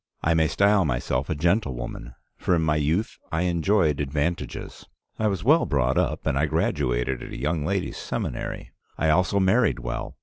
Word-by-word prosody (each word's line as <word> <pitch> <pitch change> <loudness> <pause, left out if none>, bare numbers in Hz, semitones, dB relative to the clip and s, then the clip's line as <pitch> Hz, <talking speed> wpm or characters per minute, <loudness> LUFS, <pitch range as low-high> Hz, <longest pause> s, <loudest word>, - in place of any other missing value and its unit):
I 85 - +3
may 80 -1 +3
style 100 +3 +3
myself 65 -1 -1
a 80 - 0
gentlewoman, 70 - -1 0.2
for 90 - +1
in 80 - +1
my 75 -1 +2
youth 80 +9 -1
I 80 +1 0
enjoyed 85 -3 +2
advantages. 75 +4 -3 0.3
I 110 - +2
was 95 -4 -1
well 155 +8 +4
brought 65 -3 +1
up, - - -1
and 70 - +1
I 80 - +2
graduated 65 -3 0
at - - -8
a - - -6
young 75 +4 -1
ladies' 95 -1 -2
seminary. - - -4 0.3
I 80 - +1
also 90 +4 +2
married 105 +5 +3
well. - - -5
80 Hz, 175 wpm, -25 LUFS, 70-95 Hz, 0.3 s, well